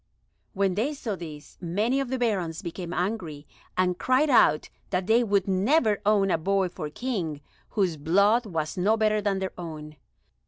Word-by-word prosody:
When 195 -2 +1
they 245 +10 -1
saw 225 -7 -4
this, 155 -4 -10
many 210 +10 0
of 275 - -1
the 260 - -1
Barons 190 -10 -1
became 170 0 -6
angry 175 -6 -3 0.3
and 180 -1 +1
cried 270 +4 +2
out 155 -10 +4 0.2
that 180 -1 -1
they 225 +4 +4
would 200 -3 +1
never 210 +3 +2
own 200 -2 +3
a 165 - +1
boy 195 +2 +1
for 155 -3 -6
King 175 - -3 0.3
whose 185 -7 0
blood 200 +10 +3
was 160 -4 -3
no 205 +5 +2
better 215 -1 +2
than 200 -2 0
their 190 -1 -3
own. 155 -3 -8
195 Hz, 170 wpm, -26 LUFS, 170-220 Hz, 0.3 s, out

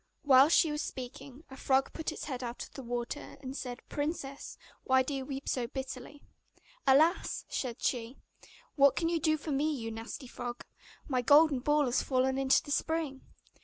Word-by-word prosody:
Whilst 280 +2 +6
she 320 - +4
was 300 0 -2
speaking, 265 +2 -7
a - - -8
frog 265 0 +1
put 320 0 -3
its - - -7
head 260 -4 -4
out 240 0 -5
of - - -13
the 270 - -7
water, 240 +3 -5
and 265 -1 -7
said, 250 -3 -6
'Princess, 290 -2 -4 0.3
why 260 0 +4
do 280 - -4
you 270 -1 -3
weep 275 -1 -6
so 245 -2 -1
bitterly?' 265 +2 -7 0.6
'Alas!' 310 +7 +3
said 245 -4 -3
she, 245 +1 -1 0.6
'what 280 -1 +5
can 330 -1 0
you 335 -1 +1
do 310 0 +2
for 305 +1 -6
me, 290 +3 +1
you 230 -6 -4
nasty 225 +4 -7
frog? 245 0 -6 0.4
My 255 -3 +1
golden 290 +2 +6
ball 295 +3 +2
has 250 +1 +1
fallen 265 0 +1
into 270 -1 +3
the 290 - -8
spring. 310 -3 -1
270 Hz, 185 wpm, -31 LUFS, 255-295 Hz, 0.6 s, Whilst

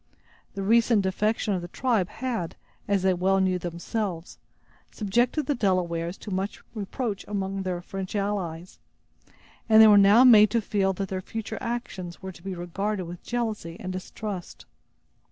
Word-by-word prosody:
The 195 - -3
recent 230 0 +4
defection 210 +2 0
of 185 - -1
the 175 - -6
tribe 220 -2 0
had, 235 -10 -4 0.3
as 200 -2 +1
they 190 -1 +4
well 190 +2 +2
knew 185 -1 +1
themselves, 175 +1 -4 0.5
subjected 240 +8 0
the 290 - +1
Delawares 180 -6 0
to 210 - -7
much 190 +2 -3
reproach 210 0 -4
among 195 -1 -2
their 180 -2 -3
French 195 +1 -6
allies; 185 -4 -3 0.9
and 220 0 +7
they 220 - +10
were 210 -1 +8
now 205 +5 +7
made 215 -4 +8
to 235 - +1
feel 200 -3 0
that 195 0 -4
their 185 -1 -3
future 220 +3 -5
actions 190 -7 -5
were 190 - -7
to 175 - -15
be 190 0 -5
regarded 190 +3 -3
with 175 +1 -8
jealousy 220 -8 -3
and 185 0 -5
distrust. 185 0 -6
195 Hz, 160 wpm, -26 LUFS, 185-215 Hz, 0.9 s, they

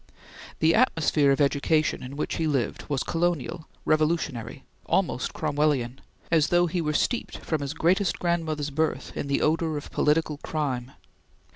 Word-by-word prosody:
The 160 +1 +5
atmosphere 160 - +3
of 135 - +1
education 145 +2 +2
in 130 +2 -7
which - - -2
he 160 - 0
lived 135 -7 -1
was 140 -2 0
colonial, 165 -2 -1 0.2
revolutionary, 155 -6 0 0.2
almost 175 -9 0
Cromwellian, 145 -5 0 0.3
as 160 -3 +4
though 175 0 +4
he 175 +1 -1
were 150 -2 0
steeped, 230 +10 -1
from 160 -3 -2
his 140 +2 -4
greatest 185 +3 +2
grandmother's 160 -4 -1
birth, 160 +2 -1
in - - -3
the 140 - +1
odor 160 0 +1
of 145 - -8
political 150 0 +1
crime. 135 -4 -3
155 Hz, 150 wpm, -26 LUFS, 140-165 Hz, 0.3 s, The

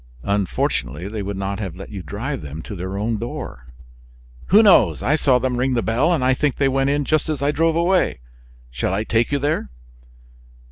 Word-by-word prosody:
"Unfortunately, 100 -2 -1
they 105 +1 -4
would 100 0 -4
not 100 +1 -3
have 95 -6 -5
let 95 +1 -10
you 100 -3 -6
drive 75 -6 -4
them 75 +2 -7
to 105 - -7
their 95 +2 -5
own 110 +1 -1
door." 65 - -6 0.8
"Who 210 +5 +6
knows? 115 - +5
I 140 - +3
saw 135 -5 +3
them 125 0 -1
ring 130 +1 +1
the 115 - 0
bell, 125 +9 +2
and 160 -7 +1
I 130 - +4
think 140 +1 0
they 140 - +2
went 135 0 +1
in 145 0 0
just 155 +1 +1
as 150 -3 -2
I 145 - +2
drove 165 +1 +1
away. 170 - +1 0.5
Shall 65 +9 -1
I 105 - -1
take 115 +3 +1
you 145 - +2
there?" 145 - -1
120 Hz, 205 wpm, -21 LUFS, 95-145 Hz, 0.8 s, Who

